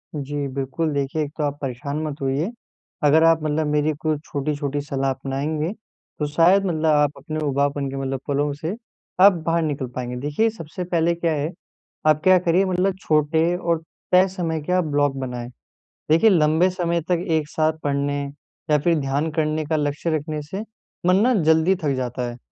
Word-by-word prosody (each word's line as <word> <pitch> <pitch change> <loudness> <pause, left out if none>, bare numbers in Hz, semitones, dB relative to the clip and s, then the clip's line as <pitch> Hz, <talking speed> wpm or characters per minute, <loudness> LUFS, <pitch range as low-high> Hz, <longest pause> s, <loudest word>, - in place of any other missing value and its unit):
जी, 145 0 -3
बिल्कुल 140 +4 -2
देखिए 140 +2 -1
एक 145 - -6
तो 155 - -1
आप 145 0 -1
परेशान 140 +2 -4
मत 150 -1 -5
होइए 135 +7 0 0.5
अगर 150 +2 +5
आप 165 -1 +4
मतलब 155 0 0
मेरी 150 +1 +1
कोई 155 -1 0
छोटी-छोटी 145 0 -2
सलाह 135 -2 -1
अपनाएँगे, 140 +5 -2 0.5
तो 150 - 0
शायद 175 +6 +4
मतलब 160 -4 -1
आप 150 -2 +4
अपने 155 -2 -5
उबाऊपन 140 0 0
के 135 - -6
मतलब 135 0 -2
पलों 145 0 0
से 160 +7 -4 0.5
आप 200 +1 +9
बाहर 165 0 +2
निकल 145 -4 -2
पाएँगे। 125 -1 -4
देखिए 150 +11 +1
सबसे 180 -4 -7
पहले 170 -1 +1
क्या 170 -1 0
है 150 +2 -2 0.6
आप 155 0 +4
क्या 185 0 +6
करिए 175 +2 +2
मतलब 185 +1 +1
छोटे 160 +2 +2
और 170 -2 0 0.3
तय 185 +1 +6
समय 170 -4 -3
के 180 +5 -2
आप 185 0 +3
ब्लॉक 145 -2 +1
बनाएँ, 125 -2 -5 0.6
देखिए 165 +8 +6
लंबे 160 0 +4
समय 170 -2 -1
तक 175 -1 +1
एक 160 -2 +1
साथ 155 0 +1
पढ़ने 145 0 0 0.5
या 150 - +6
फ़िर 170 +3 +2
ध्यान 140 +3 -1
करने 155 0 0
का 160 +2 -1
लक्ष्य 145 +2 -1
रखने 155 0 -4
से 190 +8 -6 0.4
मन 180 +1 +5
ना 250 +3 +4
जल्दी 160 +4 +4
थक 145 -2 +1
जाता 125 -1 -3
है 120 - -8
155 Hz, 185 wpm, -22 LUFS, 140-165 Hz, 0.6 s, आप